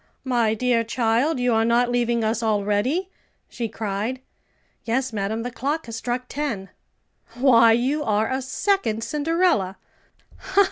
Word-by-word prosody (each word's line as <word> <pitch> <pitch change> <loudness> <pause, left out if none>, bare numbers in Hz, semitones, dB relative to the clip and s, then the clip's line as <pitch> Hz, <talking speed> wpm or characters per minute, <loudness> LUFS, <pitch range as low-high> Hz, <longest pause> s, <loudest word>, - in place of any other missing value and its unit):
"My 240 -4 +1
dear 240 0 +1
child, 235 +5 +1
you 245 -1 +2
are 225 0 +3
not 240 +1 +2
leaving 240 -1 +1
us 220 +1 0
already?" 215 - 0 0.4
she 230 -2 -4
cried. 215 +3 -3 0.6
"Yes, 245 +2 -1
madam; 215 +2 -2
the 245 - -4
clock 285 +7 -2
has 230 - -7
struck 245 +2 -3
ten." 250 -11 -4 0.7
"Why, 235 -3 +6
you 265 +6 0
are 215 -1 +1
a 260 +1 -1
second 260 - 0
Cinderella." 300 - +1
235 Hz, 135 wpm, -23 LUFS, 220-260 Hz, 0.7 s, Why